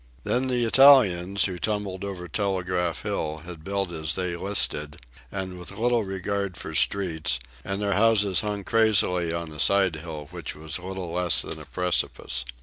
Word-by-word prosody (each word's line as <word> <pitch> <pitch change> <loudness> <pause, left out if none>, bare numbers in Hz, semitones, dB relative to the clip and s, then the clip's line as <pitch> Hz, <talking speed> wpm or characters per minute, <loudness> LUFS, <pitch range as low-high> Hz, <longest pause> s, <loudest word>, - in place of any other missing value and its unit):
Then 130 +2 0
the 125 -2 +2
Italians, 105 -8 +5
who 90 -3 -4
tumbled 100 -2 -3
over 95 -3 -6
Telegraph 90 -2 -2
Hill, 80 0 -3
had 85 -3 -9
built 100 0 -2
as 80 -2 -2
they 90 -2 -2
listed 85 -6 +1 0.3
and 95 -2 -5
with 90 - -6
little 115 +3 +1
regard 95 -1 -3
for - - -7
streets, 85 -9 +1 0.3
and 95 +1 -3
their 100 -1 0
houses 105 -3 +3
hung 105 -2 -3
crazily 100 -6 +3
on 85 -1 -4
a 75 - -10
side 95 -4 +3
hill 80 -2 -8
which - - -7
was 80 +3 -4
little 90 -1 -6
less 90 0 +4
than - - -7
a - - -11
precipice. 90 -8 -1
95 Hz, 165 wpm, -25 LUFS, 85-100 Hz, 0.3 s, Italians